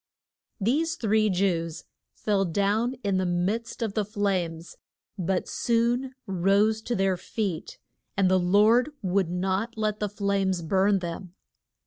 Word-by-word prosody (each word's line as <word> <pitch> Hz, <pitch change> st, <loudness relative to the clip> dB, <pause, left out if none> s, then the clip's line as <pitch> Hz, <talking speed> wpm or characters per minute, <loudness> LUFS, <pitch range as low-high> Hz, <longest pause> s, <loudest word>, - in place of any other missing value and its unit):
These 300 Hz, +11 st, +1 dB
three 215 Hz, -5 st, +2 dB
Jews 175 Hz, -4 st, 0 dB, 0.3 s
fell 205 Hz, -2 st, +1 dB
down 205 Hz, +7 st, 0 dB
in 200 Hz, -2 st, +1 dB
the 185 Hz, -, 0 dB
midst 205 Hz, +8 st, -1 dB
of 215 Hz, -3 st, -2 dB
the 215 Hz, -, +1 dB
flames, 185 Hz, -5 st, -2 dB, 0.4 s
but 185 Hz, -1 st, -1 dB
soon 240 Hz, +3 st, 0 dB
rose 200 Hz, +4 st, +2 dB
to 240 Hz, +2 st, -2 dB
their 190 Hz, -1 st, +1 dB
feet, 185 Hz, -3 st, -4 dB, 0.4 s
and 195 Hz, -1 st, +4 dB
the 185 Hz, 0 st, +4 dB
Lord 210 Hz, +8 st, +4 dB
would 190 Hz, -1 st, +1 dB
not 190 Hz, +6 st, -1 dB
let 215 Hz, -1 st, -1 dB
the 210 Hz, -, -1 dB
flames 195 Hz, -3 st, 0 dB
burn 195 Hz, +4 st, +3 dB
them. 180 Hz, 0 st, -6 dB
200 Hz, 135 wpm, -26 LUFS, 185-220 Hz, 0.4 s, and